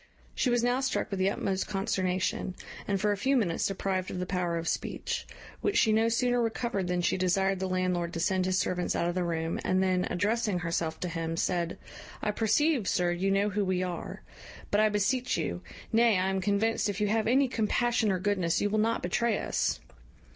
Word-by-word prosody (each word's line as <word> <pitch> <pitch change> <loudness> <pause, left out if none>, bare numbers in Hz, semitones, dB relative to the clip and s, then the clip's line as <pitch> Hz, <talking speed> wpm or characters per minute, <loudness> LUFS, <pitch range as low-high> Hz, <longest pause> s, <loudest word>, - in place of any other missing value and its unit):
She 255 - +1
was 240 -1 +2
now 245 +1 +2
struck 265 -4 -1
with 195 - -2
the 190 +1 +3
utmost 195 -1 -2
consternation, 185 -2 -1 0.3
and 200 -1 0
for 210 +1 +2
a 205 - 0
few 265 +7 +2
minutes 180 -8 +1
deprived 190 -1 -2
of - - -5
the 180 - -2
power 180 -2 -1
of 165 0 -4
speech; - - -3 0.3
which 410 - 0
she 220 - +4
no 225 +1 +3
sooner 245 +1 +2
recovered 225 -4 -1
than 180 0 0
she - - +1
desired 190 +1 +1
the 190 0 -2
landlord 180 -2 0
to 165 - -3
send 185 +1 +1
his 185 0 +1
servants 180 -1 0
out 170 - 0
of 175 - -1
the 180 0 -1
room, 165 -1 -2
and 185 0 +2
then, 185 -1 +1
addressing 210 +2 0
herself 170 -2 -2
to 180 - -1
him, 165 -1 -3
said, 170 -1 -1 0.4
"I 210 - -1
perceive, 235 +3 +2
sir, 175 -1 +1
you 180 +3 0
know 200 +1 +2
who 205 +1 0
we 185 -1 0
are; 180 -1 -5 0.5
but 205 - +4
I 215 - +4
beseech 230 +5 0
you 85 0 -3 0.3
nay, 230 -2 +5
I 185 +1 +1
am 190 0 -1
convinced, 210 +3 +1
if 200 0 -3
you 210 - +2
have 220 0 +1
any 265 +3 +4
compassion 235 -1 +1
or 185 - +1
goodness, 185 -3 0
you 205 - 0
will 215 - +1
not 230 +2 +1
betray 215 +5 +1
us." - - -1
195 Hz, 210 wpm, -29 LUFS, 180-220 Hz, 0.5 s, nay